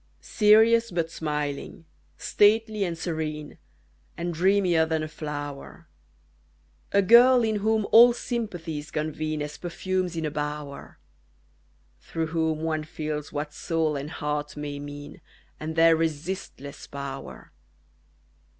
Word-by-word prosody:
Serious 225 +2 +4
but 170 -3 -2
smiling, 150 +1 -4 0.3
stately 215 0 +3
and 170 -3 -2
serene, 155 -3 -4 0.6
And 170 0 -3
dreamier 180 -1 +3
than 160 -1 -1
a - - -3
flower; 145 -2 -7 1.1
A 200 0 +4
girl 240 +4 +7
in 220 -1 +1
whom 215 +1 +1
all 240 +2 +9
sympathies 175 - -4
convene 155 0 -3
As 150 0 -7
perfumes 180 0 -2
in 165 -1 -2
a 150 - -2
bower; 150 -1 -5 1.0
Through 165 -1 -3
whom 160 -1 0
one 160 -1 -1
feels 150 -1 -5
what 150 0 -4
soul 160 -2 -1
and 140 +1 -4
heart 150 -1 -4
may 145 -1 -5
mean, 145 0 -9 0.4
And 160 +1 -5
their 165 0 +6
resistless 160 -2 -4
power. 140 -1 -8
160 Hz, 120 wpm, -26 LUFS, 150-190 Hz, 1.1 s, all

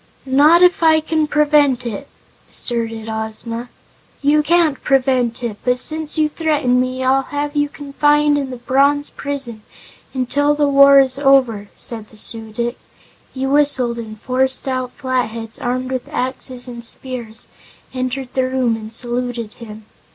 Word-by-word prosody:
"Not 295 +6 +5
if 360 -1 +4
I 320 -1 +5
can 315 0 -1
prevent 295 -4 +2
it!" 220 -4 -5 0.4
asserted 225 -2 -1
Ozma. 220 +2 -5 0.5
"You 295 +2 +4
can't 320 -2 +2
prevent 255 -3 +1
it. 225 -3 -4
But 250 0 +1
since 310 +3 +2
you 310 -1 +3
threaten 295 -6 0
me, 255 0 -3
I'll 265 +1 +3
have 290 +2 -4
you 290 0 +1
confined 295 +1 +1
in 280 -2 -2
the 255 - -7
bronze 280 +4 +1
prison 270 -6 -3 0.5
until 285 +3 0
the 295 -1 +1
war 280 0 +7
is 265 0 +2
over," 255 -7 +2
said 225 -3 -6
the 215 - -17
Su 220 0 +2
dic. 235 +3 -3 0.5
He 265 0 -4
whistled 270 -4 +2
and 215 -2 -8
four 255 +3 +1
stout 260 -1 -1
Flatheads, 235 -4 -3
armed 255 +1 -3
with 255 -1 -4
axes 255 0 -3
and 240 -1 -8
spears, 240 -2 -5 0.4
entered 255 0 -3
the 260 -1 0
room 255 -3 0
and 220 0 -9
saluted 240 -1 -3
him. 215 -2 -11
260 Hz, 150 wpm, -18 LUFS, 235-290 Hz, 0.5 s, war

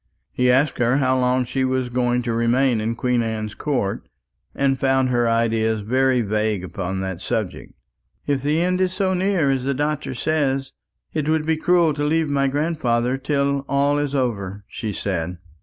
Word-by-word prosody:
He 125 0 +1
asked 130 +2 +2
her 120 +2 +3
how 130 -2 +2
long 125 0 +2
she 130 +2 -1
was 130 -1 0
going 125 0 0
to 120 -1 -2
remain 115 +1 +2
in 115 +2 -1
Queen 125 0 +1
Anne's 110 -2 -3
Court, 125 -7 -2 0.5
and 135 -1 +1
found 135 -1 +2
her 120 -1 +2
ideas 110 -1 +1
very 130 +3 +2
vague 105 -2 -1
upon 95 +1 -4
that 95 -2 -4
subject. 95 -2 -4 0.5
"If 140 -2 0
the 150 +4 +1
end 180 +1 +1
is 185 -1 +1
so 190 -1 0
near 185 -6 +1
as 135 -2 -1
the 140 +1 -1
doctor 145 -1 -2
says, 135 -2 -1 0.4
it 155 -1 -1
would 155 -1 +1
be 160 0 +2
cruel 170 0 +3
to 145 0 -3
leave 155 +1 +1
my 140 -1 +2
grandfather 135 -5 0
till 140 0 0
all 140 +1 +2
is 145 -1 -2
over," 100 -6 -2
she 110 - -5
said. 90 -3 -3
130 Hz, 180 wpm, -22 LUFS, 115-145 Hz, 0.5 s, her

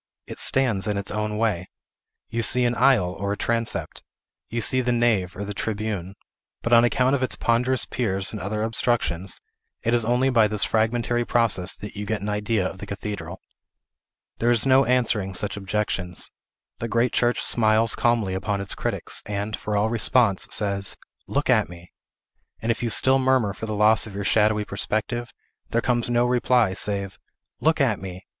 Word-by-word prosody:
It - - -9
stands 115 -7 +1
in 105 -1 -1
its 100 -1 -4
own 105 0 -2
way. 105 -5 -1 0.6
You 115 +1 -2
see 120 +3 +4
an 120 - +1
aisle, 120 -8 +3
or 100 0 -2
a - - -5
transept; 115 -1 -2 0.5
you 120 - -2
see 130 +3 +2
the 125 0 0
nave, 115 -7 +1
or 100 - -4
the 105 - -5
tribune; 100 -3 -4 0.5
but, 115 - 0
on 115 0 +7
account 125 +2 +2
of 140 - +1
its 130 - -1
ponderous 125 +2 +1
piers 95 -6 -1
and 105 - -6
other 105 +3 -2
obstructions, 110 -6 0 0.4
it 115 - +1
is 120 -1 +3
only 125 +3 +2
by 115 -3 +4
this 105 -1 0
fragmentary 120 +2 +1
process 110 -7 +1
that 105 +1 -9
you 105 0 -5
get 110 -1 -1
an 105 - -3
idea 105 -1 0
of 95 - -9
the 105 - -8
cathedral. 100 -3 -6 1.0
There 120 - +2
is 120 -1 +4
no 135 0 +5
answering 115 -6 +1
such 105 0 -1
objections. 95 -3 -3 0.5
The 115 - -3
great 115 +2 +1
church 120 0 +1
smiles 110 -1 +3
calmly 115 -5 +1
upon 100 +1 -2
its 100 -1 -4
critics, - - -2
and, 105 +1 -3
for 105 -1 -3
all 110 +2 +1
response, 115 -3 +2
says, 100 -2 +1 0.3
"Look - - -1
at - - +3
me!" 85 0 -13 0.7
and 115 - 0
if 115 - -3
you 120 - -1
still 130 +4 +4
murmur 130 -6 +2
for 110 - -7
the 110 - -3
loss 105 +1 +4
of 100 - -10
your 100 - -3
shadowy 105 +1 +2
perspective, 110 +4 -3 0.4
there 115 - +1
comes 120 0 0
no 120 0 +2
reply, 125 -4 +2
save, 100 0 -1 0.4
"Look 160 +1 +2
at 125 -8 +2
me!" 95 -1 -8
110 Hz, 185 wpm, -24 LUFS, 100-120 Hz, 1.0 s, on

